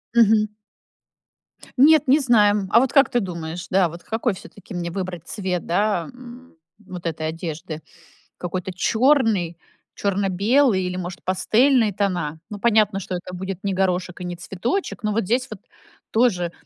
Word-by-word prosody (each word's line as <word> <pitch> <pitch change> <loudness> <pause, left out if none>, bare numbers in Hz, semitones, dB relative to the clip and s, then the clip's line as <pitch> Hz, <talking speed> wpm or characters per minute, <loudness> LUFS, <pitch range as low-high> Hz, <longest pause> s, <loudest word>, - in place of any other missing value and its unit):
Мгм. 220 -2 +5 1.3
Нет, 300 +2 +6
не 275 +4 +5
знаем. 210 -7 +3
А 230 - +7
вот 260 +1 +1
как 275 -2 +5
ты 245 - +2
думаешь, 175 -3 -5
да, 190 -2 +3
вот 170 +2 -10
какой 225 +1 -1
всё-таки 200 +2 -12
мне 175 -1 -3
выбрать 175 -2 -5
цвет, 185 -4 -3
да, 190 -1 0
м, 250 -3 -13 0.2
вот 185 -4 -10
этой 160 -1 -2
одежды? 160 0 -6 0.6
Какой-то 180 +1 -4
чёрный, 220 - +2 0.4
чёрно-белый 200 +3 +2
или, 180 0 -3
может, 180 -1 -6
пастельные 225 +5 +3
тона? 175 -6 -2
Ну, 205 - -6
понятно, 215 -3 +3
что 185 -1 -5
это 180 +1 -7
будет 190 0 -6
не 200 -1 -1
горошек 185 -1 -1
и - - -4
не 175 0 -4
цветочек, 230 - -3
но 210 -2 -1
вот 225 +2 0
здесь 250 +6 0
вот 215 -3 -9 0.5
тоже 195 -8 +2
195 Hz, 155 wpm, -22 LUFS, 180-230 Hz, 1.3 s, А